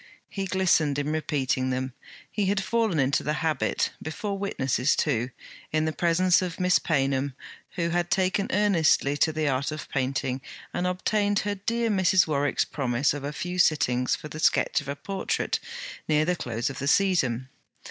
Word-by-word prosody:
He 195 Hz, -1 st, -3 dB
glistened 175 Hz, -6 st, +2 dB
in 145 Hz, +1 st, -1 dB
repeating 135 Hz, -4 st, 0 dB
them; 130 Hz, 0 st, -2 dB, 0.4 s
he 205 Hz, -3 st, 0 dB
had 200 Hz, 0 st, +1 dB
fallen 225 Hz, -6 st, +1 dB
into 135 Hz, +1 st, +2 dB
the 150 Hz, -, -1 dB
habit; 155 Hz, -1 st, 0 dB
before 200 Hz, +6 st, -4 dB
witnesses 135 Hz, -9 st, 0 dB
too; 125 Hz, -5 st, 0 dB, 0.4 s
in 155 Hz, 0 st, +1 dB
the 155 Hz, -, -1 dB
presence 175 Hz, +2 st, +3 dB
of 180 Hz, -1 st, -4 dB
Miss 180 Hz, -3 st, +4 dB
Paynham, 135 Hz, -3 st, 0 dB, 0.4 s
who 170 Hz, -1 st, 0 dB
had 175 Hz, 0 st, 0 dB
taken 190 Hz, +2 st, +1 dB
earnestly 185 Hz, -, +3 dB
to 160 Hz, -, +3 dB
the 155 Hz, -1 st, -1 dB
art 135 Hz, 0 st, 0 dB
of 155 Hz, -1 st, -6 dB
painting, 135 Hz, 0 st, -1 dB, 0.3 s
and 180 Hz, -, -1 dB
obtained 205 Hz, +3 st, 0 dB
her 205 Hz, 0 st, -1 dB
dear 230 Hz, +3 st, -1 dB
Mrs. 190 Hz, -2 st, +4 dB
Warwick's 145 Hz, -3 st, +1 dB
promise 130 Hz, -1 st, 0 dB
of 145 Hz, -1 st, -6 dB
a 145 Hz, -, -3 dB
few 180 Hz, +4 st, -4 dB
sittings 125 Hz, -7 st, +3 dB
for -, -, -8 dB
the 150 Hz, +1 st, -8 dB
sketch 155 Hz, -, +2 dB
of 145 Hz, -, -12 dB
a 140 Hz, -, -3 dB
portrait, 195 Hz, +6 st, -2 dB, 0.5 s
near 155 Hz, 0 st, +3 dB
the 180 Hz, +1 st, +1 dB
close 120 Hz, -5 st, -3 dB
of 130 Hz, -, -8 dB
the 140 Hz, -, -3 dB
season. 135 Hz, -9 st, +2 dB
155 Hz, 175 wpm, -26 LUFS, 135-185 Hz, 0.5 s, Miss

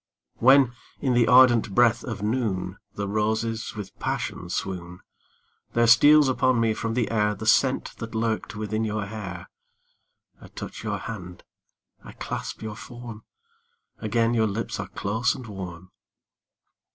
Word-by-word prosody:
When, 130 Hz, 0 st, +6 dB, 0.3 s
in 130 Hz, -3 st, +1 dB
the 120 Hz, -1 st, +4 dB
ardent 120 Hz, -4 st, +5 dB
breath 120 Hz, -1 st, +4 dB
of 110 Hz, -4 st, -5 dB
noon, 105 Hz, -5 st, -1 dB, 0.2 s
The 100 Hz, 0 st, -3 dB
roses 110 Hz, +2 st, -1 dB
with 105 Hz, -2 st, -8 dB
passion 90 Hz, -, -3 dB
swoon; 90 Hz, -1 st, -4 dB, 0.7 s
There 120 Hz, 0 st, +3 dB
steals 145 Hz, +6 st, +7 dB
upon 130 Hz, -1 st, +2 dB
me 115 Hz, -1 st, +2 dB
from 115 Hz, +1 st, -3 dB
the 120 Hz, -3 st, 0 dB
air 105 Hz, -2 st, +1 dB
The 110 Hz, -, -7 dB
scent 130 Hz, +4 st, +2 dB
that 115 Hz, -1 st, -7 dB
lurked 110 Hz, -1 st, -1 dB
within 110 Hz, +1 st, -2 dB
your 105 Hz, -1 st, -2 dB
hair; 95 Hz, -5 st, -7 dB, 0.9 s
I -, -, -12 dB
touch -, -, -8 dB
your -, -, -2 dB
hand, 90 Hz, -6 st, -8 dB, 0.6 s
I -, -, -11 dB
clasp -, -, -6 dB
your 110 Hz, -1 st, -5 dB
form 120 Hz, -1 st, -10 dB, 0.7 s
Again 115 Hz, +2 st, +1 dB
your 110 Hz, -2 st, +2 dB
lips 105 Hz, +3 st, -3 dB
are -, -, -4 dB
close 110 Hz, +5 st, -1 dB
and 130 Hz, -, -9 dB
warm. 95 Hz, -3 st, -8 dB
110 Hz, 145 wpm, -25 LUFS, 105-120 Hz, 0.9 s, steals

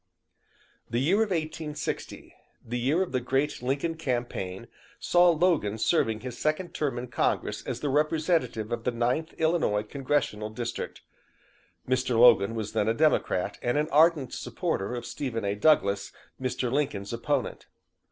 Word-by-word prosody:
The 115 Hz, -, -1 dB
year 155 Hz, +11 st, +3 dB
of 220 Hz, -1 st, +2 dB
1860 155 Hz, -3 st, -4 dB, 0.3 s
the 120 Hz, +2 st, -3 dB
year 145 Hz, +10 st, +2 dB
of 185 Hz, -, -7 dB
the 130 Hz, -, +1 dB
great 135 Hz, +3 st, -1 dB
Lincoln 140 Hz, +6 st, -1 dB
campaign 120 Hz, -, -3 dB, 0.3 s
saw 175 Hz, 0 st, +4 dB
Logan 160 Hz, -, +2 dB
serving 110 Hz, -4 st, +1 dB
his 125 Hz, -1 st, -7 dB
second 155 Hz, +4 st, -1 dB
term 140 Hz, -5 st, -1 dB
in 120 Hz, -, -3 dB
Congress 115 Hz, -, -1 dB
as -, -, -4 dB
the 145 Hz, -, -1 dB
representative 150 Hz, -, +1 dB
of 120 Hz, -1 st, -2 dB
the -, -, +1 dB
Ninth 125 Hz, +7 st, -1 dB
Illinois 160 Hz, -11 st, +1 dB
Congressional 125 Hz, -3 st, -1 dB
District. 120 Hz, +2 st, -5 dB, 0.8 s
Mr. 125 Hz, -1 st, +1 dB
Logan 115 Hz, -3 st, +6 dB
was 110 Hz, -2 st, -4 dB
then 105 Hz, -, +1 dB
a 115 Hz, -, +2 dB
Democrat 115 Hz, -9 st, +1 dB
and 120 Hz, +3 st, 0 dB
an 150 Hz, +1 st, 0 dB
ardent 155 Hz, -3 st, +4 dB
supporter 100 Hz, +6 st, -3 dB
of 120 Hz, -1 st, -5 dB
Stephen 115 Hz, -7 st, -4 dB
A. 100 Hz, -, 0 dB
Douglas, 100 Hz, -5 st, +2 dB, 0.3 s
Mr. 130 Hz, -1 st, -1 dB
Lincoln's 120 Hz, -8 st, -1 dB
opponent. 115 Hz, -, -2 dB
125 Hz, 150 wpm, -27 LUFS, 115-155 Hz, 0.8 s, Logan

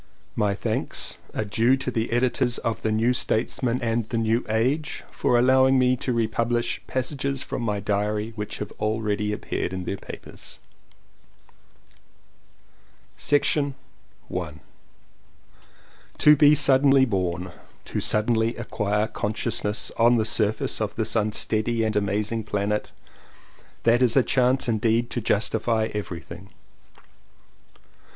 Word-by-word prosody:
My 100 Hz, -1 st, +1 dB
thanks -, -, -2 dB, 0.2 s
are 110 Hz, -, -1 dB
due 115 Hz, +6 st, +2 dB
to 130 Hz, -1 st, -3 dB
the 115 Hz, -1 st, -2 dB
editors 120 Hz, 0 st, +1 dB
of 115 Hz, -1 st, -3 dB
The 110 Hz, -, 0 dB
New 115 Hz, +3 st, +2 dB
Statesman 120 Hz, +1 st, -1 dB
and 115 Hz, -1 st, -1 dB
The 115 Hz, -, -2 dB
New 115 Hz, +2 st, +1 dB
Age 130 Hz, +8 st, 0 dB
for 120 Hz, -, +1 dB
allowing 130 Hz, +2 st, +4 dB
me 130 Hz, 0 st, +3 dB
to 125 Hz, -, -2 dB
republish 115 Hz, +1 st, 0 dB
passages 135 Hz, +1 st, -2 dB
from -, -, -5 dB
my 105 Hz, -3 st, -1 dB
diary 105 Hz, +2 st, -1 dB
which 105 Hz, -1 st, -5 dB
have 105 Hz, -, -6 dB
already 105 Hz, -1 st, -1 dB
appeared 100 Hz, -3 st, -3 dB
in 95 Hz, -1 st, -4 dB
their 100 Hz, -, -3 dB
papers. -, -, -10 dB, 2.7 s
To 145 Hz, -1 st, +2 dB, 2.6 s
BE 150 Hz, 0 st, +6 dB
suddenly 135 Hz, -1 st, +4 dB
born, 90 Hz, -5 st, -2 dB, 0.3 s
to -, -, -3 dB
suddenly 110 Hz, +1 st, +1 dB
acquire 105 Hz, -3 st, -1 dB
consciousness 105 Hz, 0 st, -2 dB
on 120 Hz, +1 st, +5 dB
the 110 Hz, -2 st, +1 dB
surface 110 Hz, 0 st, 0 dB
of 110 Hz, -, -2 dB
this 110 Hz, -1 st, -1 dB
unsteady 110 Hz, +1 st, 0 dB
and 110 Hz, -1 st, -1 dB
amazing 105 Hz, +2 st, -1 dB
planet, 105 Hz, 0 st, -2 dB, 0.9 s
that 120 Hz, +2 st, +4 dB
is 125 Hz, 0 st, +3 dB
a 135 Hz, -, +6 dB
chance 130 Hz, +1 st, +2 dB
indeed 115 Hz, +1 st, +1 dB
to 120 Hz, -, -2 dB
justify 110 Hz, +1 st, 0 dB
everything. 90 Hz, -2 st, -7 dB
115 Hz, 120 wpm, -24 LUFS, 105-125 Hz, 2.7 s, BE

